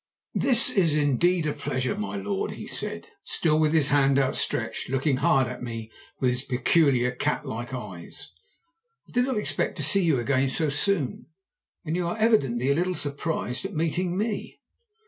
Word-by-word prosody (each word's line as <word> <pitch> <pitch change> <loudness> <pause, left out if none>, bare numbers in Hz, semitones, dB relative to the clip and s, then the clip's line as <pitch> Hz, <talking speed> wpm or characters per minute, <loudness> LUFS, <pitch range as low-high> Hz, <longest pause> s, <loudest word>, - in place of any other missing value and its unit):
"'This 250 -4 +3
is 170 -6 +2
indeed 155 +4 +2
a 150 - 0
pleasure, 130 -3 -2
my 100 -1 -4
lord,' 100 0 -2
he - - -8
said, - - -5 0.2
still 155 -2 +1
with 155 -1 +3
his 155 -3 +3
hand 140 -1 +3
out 135 -1 +1
stretched, - - -2
looking 135 +1 +1
hard 135 0 +3
at 125 +1 -7
me 115 -2 -6 0.3
with 125 -2 +2
his 125 0 -2
peculiar 130 -1 +2
cat 145 +4 -2
like 120 -1 -5
eyes. 100 -9 -8 0.8
'I - - -18
did 245 0 +2
not 260 -4 -1
expect 210 - -1
to - - -2
see 200 -1 +4
you 155 -7 +2
again 135 +2 +1
so 150 +4 +2
soon. 145 -2 0 0.6
And 160 +1 -2
you 175 -1 -1
are 175 - -3
evidently 140 - +2
a - - +5
little 180 +4 0
surprised 140 -4 -2
at - - -5
meeting 175 +3 -1
me.' 210 0 -3
145 Hz, 180 wpm, -26 LUFS, 125-170 Hz, 0.8 s, a